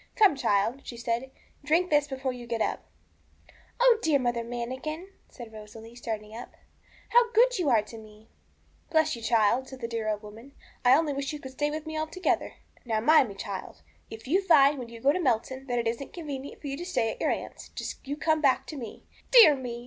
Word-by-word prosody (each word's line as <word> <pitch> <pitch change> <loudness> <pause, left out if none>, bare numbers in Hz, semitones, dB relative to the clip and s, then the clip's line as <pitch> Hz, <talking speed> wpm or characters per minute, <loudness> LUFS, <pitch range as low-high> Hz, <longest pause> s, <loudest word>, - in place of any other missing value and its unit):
'Come, 400 -8 +5
child,' 235 0 +1
she 235 - -8
said, 235 +2 -2 0.3
'drink 330 +5 +1
this 295 -1 +3
before 265 -1 -3
you 245 -1 -9
get 230 -1 -2
up.' - - -2 0.9
'Oh, 485 -2 +5
dear 315 -3 +3
Mother 240 -3 -1
Manikin,' 260 +9 -5 0.2
said 235 -3 -11
Rosalie, 220 +2 -11
starting 220 -3 -6
up, 240 - -9 0.5
how 475 -1 +4
good - - +4
you 330 -6 +1
are 225 -4 +4
to 225 +1 -11
me!' 215 0 -16 0.6
'Bless 315 -2 +2
you, 235 - -10
child!' 230 +3 +2
said 265 - -10
the 230 - -4
dear 230 -1 -3
little 215 - +1
old 210 +1 -8
woman; 225 +6 -12 0.3
'I 255 +2 +6
only 310 -2 0
wish 275 +1 -3
you 300 - -6
could 265 -2 -9
stay 295 +3 -1
with 305 +1 -5
me 315 0 -4
altogether. 315 +4 -1 0.3
Now 225 -3 -1
mind 270 +1 +5
me, 200 - -9
child, 195 -1 -7 0.3
if 225 +2 -10
you 365 +8 +3
find, 295 -6 +5
when 240 -2 -7
you 230 -1 -11
get 275 - +4
to 365 - -1
Melton, 260 -2 -1
that 245 -1 -1
it 235 -1 0
isn't 235 +4 -4
convenient 285 -5 -7
for - - -11
you 275 -1 -3
to 345 - -6
stay 245 -11 0
at - - -10
your - - +2
aunt's, - - -5
just - - -7
you 285 +1 -3
come 315 0 +1
back 270 -3 +3
to 305 - -8
me. 235 -5 -8 0.3
Dear 450 -12 +9
me! 245 -3 -6
260 Hz, 220 wpm, -27 LUFS, 230-305 Hz, 0.9 s, Dear